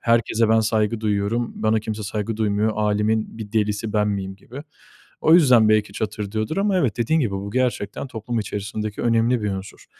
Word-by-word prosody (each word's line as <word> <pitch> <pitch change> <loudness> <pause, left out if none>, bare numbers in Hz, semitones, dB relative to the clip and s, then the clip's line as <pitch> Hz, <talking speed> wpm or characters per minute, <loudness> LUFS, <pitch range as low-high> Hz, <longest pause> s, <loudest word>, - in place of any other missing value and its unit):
herkese 115 -1 +2
ben 110 0 +4
saygı 110 0 0
duyuyorum, 110 +2 -1
bana 110 0 +2
kimse 110 0 -5
saygı 105 +1 -3
duymuyor, 105 0 +1
"Âlemin 105 +1 0
bir 105 -1 -8
delisi 105 0 -1
ben 105 -1 +2
miyim?" 95 -1 -3
gibi. 130 +8 -10 0.6
O 160 - +5
yüzden, 125 -10 +6
belki 105 -2 +2
çatırdıyordur 110 - -3
ama 200 -1 +2
evet, 125 - 0
dediğin 160 +8 +1
gibi 115 -8 0
bu 100 +1 -4
gerçekten 125 -1 -1
toplum 115 0 -4
içerisindeki 105 0 -4
önemli 115 0 +2
bir 105 - 0
unsur. 95 0 -7
110 Hz, 175 wpm, -22 LUFS, 105-115 Hz, 0.6 s, yüzden